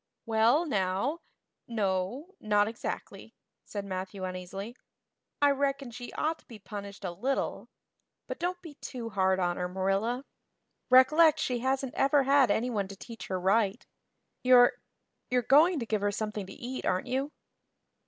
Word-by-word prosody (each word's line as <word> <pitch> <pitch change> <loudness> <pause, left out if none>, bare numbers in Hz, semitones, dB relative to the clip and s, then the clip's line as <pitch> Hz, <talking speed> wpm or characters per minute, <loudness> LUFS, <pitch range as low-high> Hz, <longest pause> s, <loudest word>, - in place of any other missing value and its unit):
"Well 230 +8 +3
now 200 - 0 0.5
no 215 - -2
not 210 -1 +2
exactly," 225 +1 -6 0.3
said 205 -1 -5
Matthew 190 0 -5
uneasily. 185 +5 -6 0.6
"I 285 0 +5
reckon 275 -2 -1
she 245 +1 -8
ought 320 +1 -1
to - - -26
be 230 - -10
punished 200 -1 -8
a 180 - -2
little. 255 +10 -2 0.6
But - - -6
don't 355 +1 -2
be 325 -4 -9
too 240 -3 -6
hard 190 -1 +2
on 175 -1 0
her, 180 - -1
Marilla. 195 +8 -1 0.6
Recollect 305 +5 +6
she 250 -4 -1
hasn't 265 +1 -1
ever 275 +1 +3
had 275 -1 +4
anyone 220 -4 0
to 195 - -9
teach 225 +3 -9
her 185 -1 -2
right. 200 +3 +1 0.6
You're 250 -1 +6 0.6
you're 250 -1 +2
going 315 +8 +5
to 240 - -2
give 215 -2 -1
her 205 0 +1
something 210 -1 -4
to 195 - -9
eat, 255 +2 -6
aren't 185 0 0
you?" 270 +3 -2
230 Hz, 155 wpm, -29 LUFS, 195-270 Hz, 0.6 s, Recollect